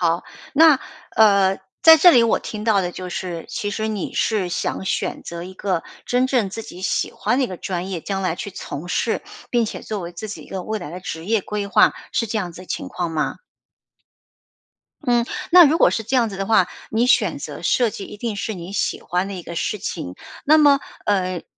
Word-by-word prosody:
好， 170 0 +1 0.3
那， 305 -2 +6 0.3
呃， 200 -3 +4 0.2
在 320 0 +9
这 355 +3 +8
里 240 -8 +6
我 230 - +2
听 215 -1 -6
到 215 -3 +3
的 180 -2 -2
就 185 +1 -7
是， 175 -1 -5
其 205 - -3
实 215 +1 -2
你 215 -4 -3
是 210 -5 +1
想 175 - -2
选 190 - -2
择 170 0 -7
一 185 +1 -10
个 185 -3 -2 0.2
真 250 +1 +2
正 245 -7 +1
自 225 - -5
己 185 -5 -10
喜 190 - 0
欢 240 +5 0
的 275 - +3
一 - - -1
个 185 - -7
专 180 0 -4
业， 185 -3 -4
将 195 +3 -3
来 185 -4 0
去 200 - -6
从 170 -3 -7
事， 225 +5 0 0.3
并 240 -2 +2
且 215 - -5
作 215 -2 -5
为 170 -1 -6
自 175 +5 -7
己 210 - -7
一 - - -16
个 190 -1 -4
未 215 -1 -3
来 145 - -7
的 175 - -6
职 165 -3 -6
业 220 +3 +1
规 205 +1 -4
划， 210 +1 +5 0.2
是 230 - 0
这 220 - -3
样 185 -5 -2
子 180 - -11
的 - - -14
情 - - -4
况 175 -2 -3
吗？ 155 -1 -1 1.7
嗯， 240 -1 +3 0.3
那 355 -1 +10
如 310 +2 +3
果 - - +6
是 225 - -1
这 230 +5 -1
样 235 -3 +3
子 200 - -7
的 195 - -2
话， 195 -4 +4 0.2
你 230 +3 +2
选 250 - +3
择 - - -7
设 245 -2 +3
计 200 -1 -6
一 210 - -10
定 225 +1 -3
是 205 +2 -3
你 175 +1 -8
喜 200 - -1
欢 180 +2 -1
的 200 - -5
一 180 - -6
个 170 - -8
事 210 +5 -2
情。 90 - -5 0.3
那 310 +2 +6
么， 285 -2 +6 0.2
嗯， 185 -3 0
200 Hz, 250 characters per minute, -21 LUFS, 180-230 Hz, 1.7 s, 那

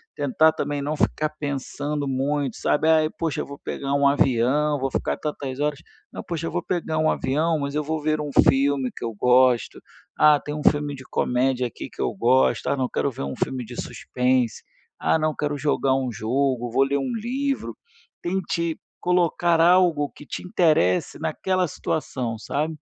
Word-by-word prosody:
tentar 160 -10 +3
também 145 -1 -3
não 150 +2 -2
ficar 155 +1 +1
pensando 145 +1 -3
muito, 135 0 -1
sabe? 155 +2 +1
"Ai, 155 -1 +4
poxa, 165 -3 -1
vou 140 0 -10
pegar 140 0 -4
um 140 0 +4
avião, 140 +2 +2
vou 135 +1 -1
ficar - - -1
tantas 140 -3 -5
horas, 145 -1 -1 0.3
não, - - -7
poxa, 165 -1 -4
eu - - -4
vou 175 0 -2
pegar 165 -3 -2
um 155 0 +3
avião, 155 +4 0
mas 140 0 -3
eu 150 - 0
vou 155 +1 -2
ver 155 0 0
um 145 -1 -4 0.2
filme 135 -1 +1
que - - -8
eu 115 - -3
gosto, 125 +1 +3 0.4
ah, 150 -1 +6
tem 150 - -6
um 150 - -5
filme 145 -1 +2
de 130 - -11
comédia 125 0 0
aqui 120 - -8
que - - -8
eu - - 0
gosto, 125 +6 +2
ah, - - +1
não, 130 -2 -1
quero 140 - -1
ver 115 - -6
um 70 0 -4
filme 130 -1 -2
de - - -8
suspense, 125 -2 -1 0.4
ah, - - +2
não, 155 0 0
quero 145 -1 -2
jogar 140 -2 +1
um 130 -2 -1
jogo, 120 +2 -1
vou 135 - +4
ler 140 +1 0
um 140 - -2
livro", 265 +5 -2 0.5
tente 170 -2 -2 0.2
colocar 175 -1 +2
algo 170 -4 +4
que 150 - -14
te - - -6
interesse 155 - +2
naquela 185 -1 0
situação, 130 -6 -3
sabe? 150 +7 -2
145 Hz, 185 wpm, -24 LUFS, 130-155 Hz, 0.5 s, ah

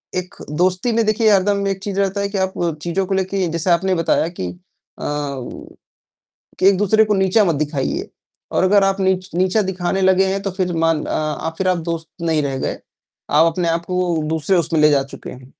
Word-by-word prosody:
एक 185 +2 -4 0.3
दोस्ती 185 +6 +2
में 230 0 +1
देखिए 215 +1 +3
हरदम 200 0 +2
एक 195 -1 -2
चीज़ 200 -1 -3
रहता 200 0 0
है 200 - -1
कि 200 - -3
आप 190 0 0 0.3
चीज़ों 180 +3 -1
को 195 - -2
लेके 190 0 0
जैसे 170 +2 -2
आपने 185 +2 +2
बताया 165 -1 +1
कि 90 - -2 0.5
अ, - - -5
वु 140 -3 -4 0.9
कि - - +3
एक-दूसरे 205 +3 +4
को 210 - +1
नीचा 190 +2 +3
मत 170 -5 +1
दिखाइए। 145 -2 -2 0.4
और - - +2
अगर 200 +1 +4
आप 195 0 0
नीच 190 0 0
नीचा 185 +4 +2
दिखाने 185 0 -2
लगे 190 0 +4
हैं, 195 +1 -1
तो 195 - -2
फिर 185 -1 -2
मान 165 -1 +1
अ, - - -4
आप 155 +1 -2
फिर 190 -1 0
आप 180 -1 +2
दोस्त 165 -1 -4
नहीं 160 -3 +1
रह 135 -1 -2
गए, - - -3 0.5
आप 155 +3 +5
अपने 170 0 -1
आप 165 +1 0
को 180 -2 0
दूसरे 160 +4 +1
उसमें 165 -2 +1
ले 150 0 +6
जा 140 -2 +3
चुके - - -9
हैं। 130 +1 -13
185 Hz, 210 wpm, -19 LUFS, 165-195 Hz, 0.9 s, ले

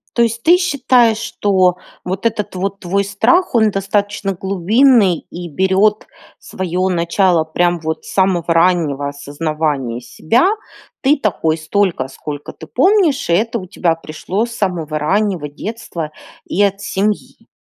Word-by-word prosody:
То 235 - +2
есть 230 0 -2
ты 345 +2 +6
считаешь, 255 - +3
что 190 -5 +1 0.3
вот 185 +4 -4
этот 210 -3 -1
вот 195 +2 -3
твой 195 +2 0
страх- 225 - +2
он 220 -2 +4
достаточно 200 0 -1
глубинный 195 - +3
и 175 0 -7
берет 190 +6 +2 0.3
свое 185 0 -2
начало 170 -1 +2
прям 175 +2 0
вот 160 0 -4
с - - -9
самого 185 -3 +2
раннего 165 -5 +2
осознавания 145 -3 -3
себя? 155 - +1 0.5
Ты 285 +3 +3
такой 165 - 0
столько, 165 -3 0
сколько 145 +1 -7
ты 160 - -12
помнишь, 320 - +2
и - - +3
это 225 +6 +1
у 185 - -9
тебя 170 -2 0
пришло 165 +7 -3
с 235 - -9
самого 170 -8 -2
раннего 185 -1 0
детства 165 -1 -6 0.3
и 195 - -1
от 200 0 +1
семьи? 205 +2 -2
190 Hz, 145 wpm, -17 LUFS, 165-215 Hz, 0.5 s, ты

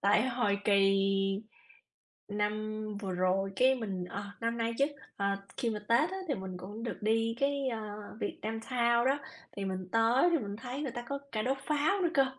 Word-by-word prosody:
Tại 210 +5 +4
hồi 225 -5 +1
kỳ 195 -1 +5 1.3
năm 210 +1 -1 0.2
vừa 195 -3 -3
rồi, 185 +2 +1
cái, 260 +1 +5
mình 195 -7 -3
ờ, 200 +3 -5 0.2
năm 230 +1 0
nay 230 0 0
chứ, 275 - +6 0.3
ờ, 200 - 0 0.3
khi 235 - 0
mà 215 - -2
Tết 240 +8 +4
á 380 - -4
thì 280 - +2
mình 190 -3 -5
cũng 205 +5 -7
được 235 - -3
đi 225 +1 +2
cái, 280 -1 +1
ờ, 230 -3 -2 0.4
Vietnam 225 +1 -3
Town 235 0 +2
đó, 275 +2 +3 0.4
thì 200 - -2
mình 185 -1 -3
tới 230 +8 +5
thì 335 - +4
mình 205 -5 -4
thấy 250 +4 -5
người 275 - -2
ta 240 +1 -5
có 280 0 -2
cả 215 -1 0
đốt 265 +4 0
pháo 305 +6 +2
nữa 350 - +3
cơ. 275 -2 +6
225 Hz, 200 wpm, -32 LUFS, 200-260 Hz, 1.3 s, chứ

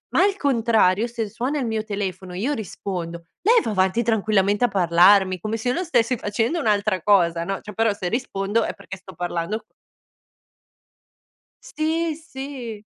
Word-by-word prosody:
ma - - +5
al 400 0 +2
contrario 225 -6 +2
se 235 -2 -4
suona 250 +7 -2
il 260 - -1
mio 220 -1 -1
telefono 195 -3 -4
e 180 - -5
io 265 +8 0
rispondo, 175 - -5 0.2
lei 460 +3 +5
va - - -2
avanti 190 +3 +2
tranquillamente 210 -2 +1
a - - +3
parlarmi 185 +1 +4
come 215 +5 -3
se 225 - -5
io 250 - +2
non 365 - -1
stessi 250 -8 +1
facendo 225 +9 -1
un'altra 210 - +1
cosa, 170 -4 +3
no, 195 +2 -3
cioè 210 - -9
però 225 +1 +2
se 200 -3 -4
rispondo 220 -1 -1
è - - -3
perché 195 -1 -10
sto 190 +1 -13
parlando 175 +4 -3 2.0
Sì, 320 +1 -1
sì. 265 -8 -8
215 Hz, 165 wpm, -23 LUFS, 190-245 Hz, 2.0 s, ma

